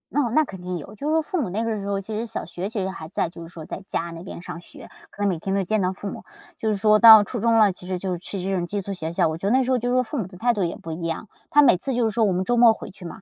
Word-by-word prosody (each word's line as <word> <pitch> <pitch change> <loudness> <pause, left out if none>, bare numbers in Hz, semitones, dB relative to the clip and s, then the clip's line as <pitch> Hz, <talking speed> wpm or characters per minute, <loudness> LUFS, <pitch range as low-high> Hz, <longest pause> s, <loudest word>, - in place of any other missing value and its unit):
哦， 285 -4 +1
那 310 - +5
肯 190 -10 -9
定 180 0 -4
有。 175 +6 -10
就 280 +7 -5
是 310 - +1
说 320 - +3
父 325 +2 -2
母 230 - -2
那 210 +5 -2
个 225 -2 -2
时 200 - -6
候 200 -1 -1
其 215 +3 -7
实 220 +2 -2
小 230 - -5
学 180 +2 -5
其 215 -1 -3
实 190 - -2
还 175 -4 -8
在 170 0 -2
就 170 - -12
是 165 - -8
说 165 -1 -10
在 190 - -7
家 170 +1 -3
那 165 0 -8
边 180 - -8
上 170 - -7
学， 175 - -14 0.2
可 - - -11
能 200 - +3
每 175 -4 -2
天 195 +4 -2
都 200 - +1
见 215 +3 0
到 185 0 0
父 200 +1 -6
母。 - - -8 0.3
就 220 - -1
是 215 - +1
说 215 +1 +4
到 220 -2 +10
初 235 +4 -5
中 230 +1 +3
了， 210 -2 +5
其 180 0 -11
实 185 0 -2
就 180 -1 -3
去 190 +2 -6
这 195 +1 -1
种 175 -2 -1
寄 200 +2 -3
宿 200 - -6
学 170 -4 -4
校， 165 - +2
我 160 - -4
觉 195 - -3
得 - - +1
那 265 - +3
时 255 - -1
候 255 - +3
就 245 0 -3
是 250 - +1
说 255 - +3
父 250 +5 -6
母 210 -8 -2
的 185 -1 -13
态 240 +5 +2
度 200 -5 0
也 170 - -3
不 165 - -8
一 160 +2 -6
样。 165 +6 -4 0.2
她 295 - +6
每 270 -10 +5
次 265 +9 -3
就 245 0 +1
是 220 - +1
说 225 0 +2
我 195 - +2
们 180 +1 0
周 240 +5 0
末 235 -1 +7
回 - - -9
去 190 -1 -13
嘛。 170 - -9
200 Hz, 400 characters per minute, -23 LUFS, 180-230 Hz, 0.3 s, 到